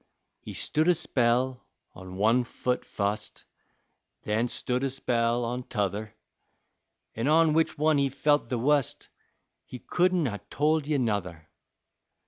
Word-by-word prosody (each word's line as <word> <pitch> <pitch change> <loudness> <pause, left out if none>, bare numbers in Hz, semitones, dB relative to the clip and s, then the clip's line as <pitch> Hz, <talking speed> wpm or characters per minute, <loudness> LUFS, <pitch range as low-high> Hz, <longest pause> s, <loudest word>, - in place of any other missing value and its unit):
He - - -9
stood 155 +2 0
a 180 - +5
spell 125 -3 0 0.3
on 95 0 -10
one 115 +5 +3
foot 125 +1 -2
fust, 105 +1 -3 0.8
Then 110 +3 0
stood 125 +1 -2
a 135 - +1
spell 120 -2 0
on 125 +2 -3
t'other. 105 -2 -3 1.0
An' 115 +4 -2
on 160 0 +4
which 160 +1 +1
one 155 0 +3
he 140 -1 +2
felt 145 -1 +1
the 125 - -1
wust 140 +2 0 0.5
He 125 - -9
couldn't 180 +4 +1
ha' 105 -5 -3
told 150 0 +1
ye 150 -1 +1
nuther. 95 - -2
125 Hz, 135 wpm, -27 LUFS, 110-150 Hz, 1.0 s, a